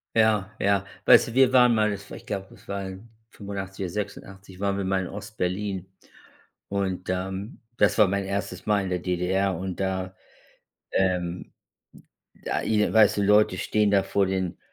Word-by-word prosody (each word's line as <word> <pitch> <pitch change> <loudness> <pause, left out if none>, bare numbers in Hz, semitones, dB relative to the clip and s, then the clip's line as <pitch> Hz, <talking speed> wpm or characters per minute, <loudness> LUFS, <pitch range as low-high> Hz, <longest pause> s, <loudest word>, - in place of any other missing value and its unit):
Ja, 105 -3 +2
ja. 100 0 +2 0.2
Weißt - - +7
du, - - -8
wir 130 0 +4
waren 125 -2 +6
mal 110 -1 +2
es 100 0 -9
war, - - -8
ich - - -15
glaube, 95 -2 -5
es - - -19
war 100 -1 -4
in 95 +4 -9 0.2
85 100 -2 -6
oder - - -4
86 95 -2 -7
waren 100 0 0
wir 100 - -2
mal 95 0 0
in - - -5
Ostberlin 95 -2 -4 0.8
und, 95 -2 -2
ähm, 95 +4 -4 0.2
das - - +3
war 105 -3 +6
mein 100 0 -1
1. 95 -2 -4
Mal 105 -2 +2
in 95 - -4
der 90 -1 -1
DDR 95 +2 0
und 95 0 -5
da, 95 -1 -2 0.8
ähm, 90 -2 -1 0.9
da - - -1
i 105 -1 +1
weißt 105 -2 +5
du, - - +2
Leute 105 +1 +4
stehen 105 -1 +1
da 100 -1 +4
vor 100 -1 +1
den 95 -2 -2
100 Hz, 180 wpm, -25 LUFS, 95-105 Hz, 0.9 s, Weißt